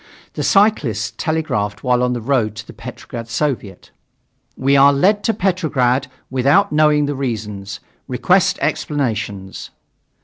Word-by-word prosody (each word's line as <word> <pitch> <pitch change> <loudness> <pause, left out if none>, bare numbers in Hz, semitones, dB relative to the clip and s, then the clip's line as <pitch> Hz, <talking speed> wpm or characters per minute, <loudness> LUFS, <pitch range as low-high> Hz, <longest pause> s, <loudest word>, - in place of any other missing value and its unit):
The - - -4
cyclists 125 - +2
telegraphed 105 - -2
while 125 -1 +2
on 125 0 +1
the 120 - -4
road 115 -4 0
to 110 - -8
the - - -12
Petrograd 115 -1 -8
Soviet: 115 -7 -3 0.7
"We 135 +2 +2
are 140 +1 +7
led 195 +9 +2
to - - +3
Petrograd 150 - +1 0.2
without 140 +10 +3
knowing 150 -1 +3
the 145 - -2
reasons. 105 -6 -4 0.3
Request 185 +9 +2
explanations." 110 - -3
130 Hz, 130 wpm, -19 LUFS, 110-155 Hz, 0.7 s, are